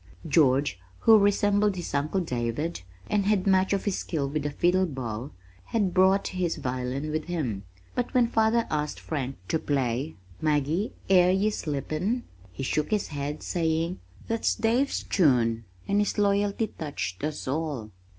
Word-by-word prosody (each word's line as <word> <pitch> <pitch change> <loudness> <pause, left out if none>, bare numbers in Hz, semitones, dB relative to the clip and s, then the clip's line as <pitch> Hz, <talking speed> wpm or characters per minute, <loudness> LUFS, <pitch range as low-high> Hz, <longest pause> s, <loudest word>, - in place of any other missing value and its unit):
George, 140 - +3 0.2
who 220 -1 +7
resembled 205 0 +3
his 175 -5 -5
uncle 150 +7 0
David, 125 - -2 0.3
and 205 -2 +1
had 205 -3 +2
much 190 -1 +3
of 200 -1 0
his 200 -3 0
skill 145 -5 -2
with 150 +2 -2
the 145 - -2
fiddle 180 +5 +2
bow, 125 -3 -5 0.4
had 200 -6 0
brought 190 +1 +4
his 180 -3 -1
violin 130 +4 -3
with 155 0 -2
him, 125 - -3 0.3
but 245 -1 -2
when 245 -1 +5
father 230 0 +2
asked 150 -1 -1
Frank 135 -4 -3
to 160 - 0
play 135 0 -1 0.3
Maggie, 155 +6 +1 0.2
air 180 -2 +6
ye 195 +3 +2
sleepin', 160 - -2 0.3
he 95 - -6
shook 150 +3 0
his 210 -2 0
head, 145 +1 -4
saying, 165 0 0 0.3
"That's 225 0 +1
Dave's 240 +5 +1
tune," 120 - +2 0.2
and 200 - +2
his 205 - 0
loyalty 205 +1 +2
touched 140 - -5
us 150 -2 -3
all. 140 -6 -2
160 Hz, 155 wpm, -27 LUFS, 140-200 Hz, 0.4 s, who